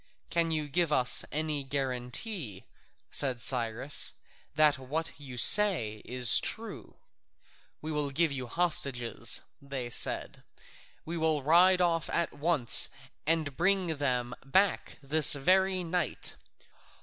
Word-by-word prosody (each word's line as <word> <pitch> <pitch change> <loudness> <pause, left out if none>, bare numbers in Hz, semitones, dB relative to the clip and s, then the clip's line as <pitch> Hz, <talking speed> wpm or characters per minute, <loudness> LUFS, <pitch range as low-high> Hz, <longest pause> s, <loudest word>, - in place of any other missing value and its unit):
"Can 170 -1 -1
you 155 -2 -3
give 165 +2 -2
us 125 -4 +1
any 150 -1 -3
guarantee," 130 - -3 0.5
said 130 -3 -1
Cyrus, 120 +3 +1 0.4
"that 150 -3 +2
what 155 +5 -6
you 135 -4 -11
say 125 - +5
is 125 -1 +5
true?" 225 0 -7 0.9
"We 155 - -6
will 150 -2 -3
give 160 +3 -1
you 130 -3 -6
hostages," 125 -7 -1 0.2
they 135 -3 -7
said; - - +2 0.6
"we 170 +2 -6
will 160 -3 -2
ride 180 +5 +3
off 165 -2 -1
at 170 - -3
once 145 -5 +4 0.4
and 155 -4 0
bring 180 -2 -1
them 125 -4 -3
back 190 +9 -1
this 150 +2 +6
very 185 +5 0
night. 175 0 -2
150 Hz, 120 wpm, -28 LUFS, 130-170 Hz, 0.9 s, this